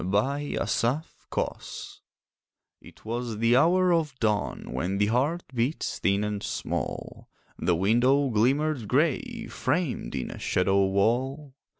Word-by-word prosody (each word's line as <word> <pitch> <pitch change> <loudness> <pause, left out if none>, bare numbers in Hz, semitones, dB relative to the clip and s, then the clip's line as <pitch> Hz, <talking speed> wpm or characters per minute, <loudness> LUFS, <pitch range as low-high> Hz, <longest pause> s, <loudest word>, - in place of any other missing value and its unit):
THE 130 - 0 0.3
PASSING - - -1 1.2
It - - -17
was 115 0 -3
the 115 +2 +3
hour 180 +6 +4
of 155 -5 0
dawn, 105 -3 -1
When 95 +2 -1
the 105 - +3
heart 140 +11 +1
beats 125 +6 -1
thin 100 +3 +2
and 105 -1 -2
small, - - -4 0.3
The 90 - +2
window 125 +9 +3
glimmered 130 +3 +1
grey, 225 - 0
Framed 140 - -2
in 65 - -3
a - - -8
shadow 95 +1 +2
wall. 130 +8 0
125 Hz, 120 wpm, -27 LUFS, 105-145 Hz, 1.2 s, hour